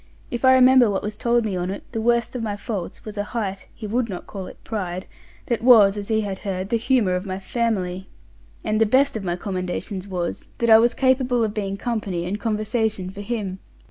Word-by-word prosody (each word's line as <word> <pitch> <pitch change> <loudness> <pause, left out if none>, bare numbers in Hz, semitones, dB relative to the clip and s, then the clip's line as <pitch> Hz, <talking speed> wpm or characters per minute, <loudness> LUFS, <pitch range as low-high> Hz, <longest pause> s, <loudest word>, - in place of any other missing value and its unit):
If 240 - -3
I 260 0 +7
remember 255 -2 +6
what 195 - -1
was 210 0 -4
told 235 +1 +1
me 205 -3 -2
on't, 180 +2 -3
the 225 - -2
worst 235 +1 +1
of 250 - -2
my 210 -2 -3
faults 200 -4 -5
was 210 -1 -6
a - - +1
height 205 -4 -4
(he 220 - -9
would 230 +2 -1
not 180 -3 -6
call 190 -2 -7
it - - -11
pride) 185 -4 -4 0.4
that 235 -2 -1
was, 220 -5 +7
as 205 -1 -5
he 220 -1 +2
had 195 -2 -4
heard, 190 -1 -4
the 230 - +2
humour 230 -5 +2
of 180 - -2
my 190 -2 -4
family; 190 -4 -2 0.5
and 215 0 0
the 225 - +5
best 265 +5 +3
of 215 - -3
my 175 -2 -1
commendations 185 +1 -4
was, 180 -3 -4
that 235 -1 +2
I 220 - +10
was 235 +1 +3
capable 260 -2 +2
of 215 -2 -1
being 195 -2 -3
company 205 -7 -2
and 200 +4 -3
conversation 215 -3 -1
for 200 +1 -8
him. 200 -4 -3
210 Hz, 220 wpm, -23 LUFS, 190-235 Hz, 0.5 s, I